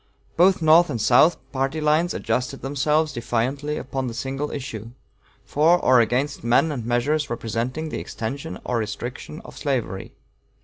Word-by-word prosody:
Both 180 0 +4
North 165 +3 +6
and 115 - -2
South, 125 +9 +5
party 135 +3 -1
lines 155 +3 +2
adjusted 130 +2 -2
themselves 150 +3 +1
defiantly 130 +5 -2
upon 130 0 -3
the 115 - -5
single 135 +3 -3
issue, 115 -5 -6 0.6
for 160 +4 +4
or 130 -7 +4
against 125 +5 -1
men 125 +7 +3
and 130 -6 -4
measures 140 +6 0
representing 120 +7 -3
the - - -4
extension 115 -4 -5
or 120 - 0
restriction 120 +8 -5
of - - -11
slavery. 125 -9 -2
135 Hz, 145 wpm, -23 LUFS, 120-150 Hz, 0.6 s, North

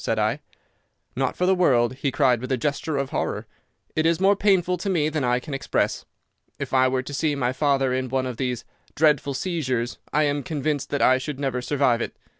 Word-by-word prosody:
said 115 - 0
I. 110 +6 +1 0.8
"'Not - - -1
for 180 - +1
the 190 - +4
world,' 130 -10 +3
he 140 - 0
cried 130 -4 +2
with 130 - -5
a 130 - +2
gesture 145 +3 -2
of 140 0 -2
horror. 105 -7 -2 0.5
'It 155 - +2
is 165 +1 +2
more 195 +2 +4
painful 190 -3 +2
to 195 +3 -3
me 155 -5 +1
than 155 -2 -2
I 125 0 +2
can 140 +3 -8
express. 135 - -1 0.5
If - - -5
I 130 0 +5
were 130 0 0
to 145 - -8
see 145 +2 0
my 125 -2 0
father 135 -1 +1
in 130 0 -1
one 130 +1 0
of 125 -3 -5
these 125 -2 -2 0.3
dreadful 145 -3 +2
seizures 130 -9 -2
I 150 +2 +3
am 145 -1 0
convinced 145 -1 -2
that 145 - 0
I 130 0 +5
should 140 0 -5
never 135 -3 -1
survive 130 -3 +1
it. - - -4
140 Hz, 220 wpm, -24 LUFS, 130-155 Hz, 0.8 s, I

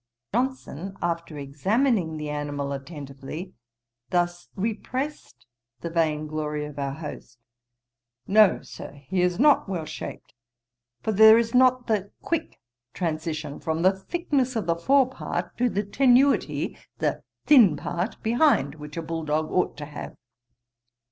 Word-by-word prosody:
Johnson, 210 - -2
after 170 -2 -3
examining 175 - 0
the 150 0 -4
animal 145 -1 -3
attentively, 140 +4 -7 0.6
thus 175 0 -1
repressed 230 - -4 0.4
the 170 - -4
vain 155 -2 +1
glory 150 -1 -3
of 150 -1 -8
our 140 -1 -2
host: 145 -5 -8 0.9
'No, 210 +1 +5
Sir, - - -9
he 145 +6 -2
is 180 -1 +1
not 290 -5 +4
well 175 -5 -3
shaped; - - -8 0.7
for 220 - 0
there 220 +2 +8
is 230 0 0
not 255 0 +4
the 205 -3 0
quick 330 -1 -3 0.4
transition 155 -3 -3
from 160 +1 -2
the 185 - +6
thickness 265 - -1
of 220 -5 -1
the 170 0 +1
fore 265 +10 +4
part, 260 - -4
to 250 0 +3
the 205 -1 -1
tenuity 260 +6 +3 0.2
the - - -1 0.2
thin 225 - +7
part 175 +8 -3
behind, 225 - +3
which 150 -1 -10
a 165 - -2
bull 165 0 -4
dog 155 +1 -1
ought 180 - 0
to 150 - -6
have.' 145 0 -8
175 Hz, 140 wpm, -25 LUFS, 150-230 Hz, 0.9 s, there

